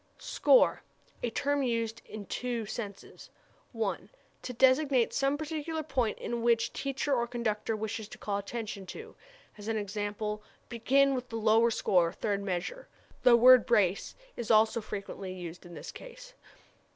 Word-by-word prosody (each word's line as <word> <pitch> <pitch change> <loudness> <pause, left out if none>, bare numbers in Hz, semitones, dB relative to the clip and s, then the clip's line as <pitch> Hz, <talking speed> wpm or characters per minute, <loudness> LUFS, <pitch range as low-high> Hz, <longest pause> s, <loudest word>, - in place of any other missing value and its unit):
Score - - +3 0.4
a 240 - -1
term 285 +4 0
used 230 -2 -1
in 210 -1 -8
two 240 -1 -3
senses: 205 -2 -8 0.4
1. 225 -4 -3 0.3
To - - -5
designate 260 0 +3
some 275 +1 +1
particular 315 +1 -4
point 260 -7 -1
to - - -5
which 235 0 +1
teacher 275 +1 -2
or 235 -2 +1
conductor 225 -2 -2
wishes 220 0 -4
to - - -11
call 200 -1 -2
attention; 205 -2 -6 0.7
as 205 +2 -6
e.g., 205 -1 -2 0.6
"Begin 270 +4 +3
with 250 -1 -4
the 230 - -6
lower 225 +1 +4
score, 180 -6 +2
third 200 -1 -2
measure." 200 - -4 0.3
The 245 -1 +7
word 255 +1 +7
brace 200 -6 +2 0.2
is 235 - -5
also 220 +1 +4
frequently 195 -2 -6
used 175 -1 -8
in 175 - -11
this - - -8
sense. - - -11
230 Hz, 145 wpm, -30 LUFS, 210-260 Hz, 0.7 s, The